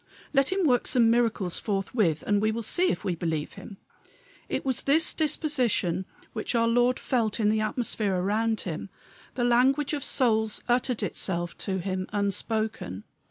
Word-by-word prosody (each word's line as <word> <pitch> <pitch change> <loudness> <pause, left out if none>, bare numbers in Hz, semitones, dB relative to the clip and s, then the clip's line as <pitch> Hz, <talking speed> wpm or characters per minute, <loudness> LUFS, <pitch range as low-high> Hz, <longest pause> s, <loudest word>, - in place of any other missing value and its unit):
Let 275 +2 +3
him 380 -1 +1
work 250 -5 +2
some 230 -3 +4
miracles 225 -7 +1
forthwith, 195 - 0
and 205 -1 +2
we 215 0 +2
will 230 +1 -3
see 360 - +1
if - - -2
we 195 - -1
will 170 - -5
believe." 160 -3 -2 0.9
It - - -2
was 260 -2 0
this 310 +3 +2
disposition 255 - 0 0.3
which - - -2
our 230 0 +3
Lord 245 +2 +3
felt 230 -4 0
in 210 -1 +3
the 215 0 +1
atmosphere 215 -3 0
around 215 +4 0
him; 170 +1 -5 0.5
the 245 - -1
language 260 +5 +3
of 285 -3 -2
souls 220 -5 +1
uttered 245 -1 +1
itself 175 -2 -2
to 190 -2 -1
him 185 0 -3
unspoken. 205 - -2
220 Hz, 160 wpm, -27 LUFS, 195-250 Hz, 0.9 s, some